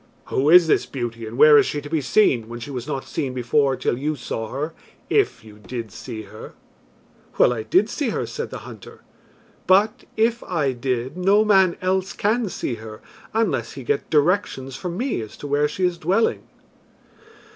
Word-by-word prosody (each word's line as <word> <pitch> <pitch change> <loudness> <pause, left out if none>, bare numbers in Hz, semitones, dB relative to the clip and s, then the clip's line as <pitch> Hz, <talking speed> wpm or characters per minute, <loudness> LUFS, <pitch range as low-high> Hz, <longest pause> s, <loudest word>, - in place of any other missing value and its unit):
"Who 140 +3 +1
is 175 +1 +8
this 160 - +2
beauty 115 -3 -5
and 115 +2 -8
where 150 +1 +8
is - - +2
she 145 - -2
to 145 - -9
be 155 0 -1
seen, 125 - +2
when 120 0 -7
she 120 +5 -7
was 125 -1 -5
not 135 -3 -3
seen 135 -5 -3
before 135 +2 +2
till 120 - -1
you 150 +2 -1
saw 115 -3 -5
her, 150 +6 -4 0.4
if 415 - +1
you 105 -1 -14
did 115 -1 -6
see 110 +2 -7
her?" 105 +2 -11 0.8
"Well, - - +5
I 115 - -4
did 185 - +2
see 285 0 -2
her," - - -2
said 465 - -5
the - - -8
hunter. - - -12 0.7
"But, 200 +3 +3
if 230 +2 +2
I 155 -7 -1
did, 125 +2 -3
no 200 +4 +4
man 190 -4 +4
else 190 0 0
can 220 +1 0
see 145 - -3
her 110 -1 -9 0.3
unless 225 +1 0
he - - -8
get 435 -1 -1
directions 150 -5 +1
from 175 +4 -5
me 245 - -1
as 110 - -9
to - - -9
where 145 +1 +2
she 185 +5 -1
is 175 -1 -1
dwelling." 195 +6 +1
150 Hz, 190 wpm, -22 LUFS, 125-190 Hz, 0.8 s, is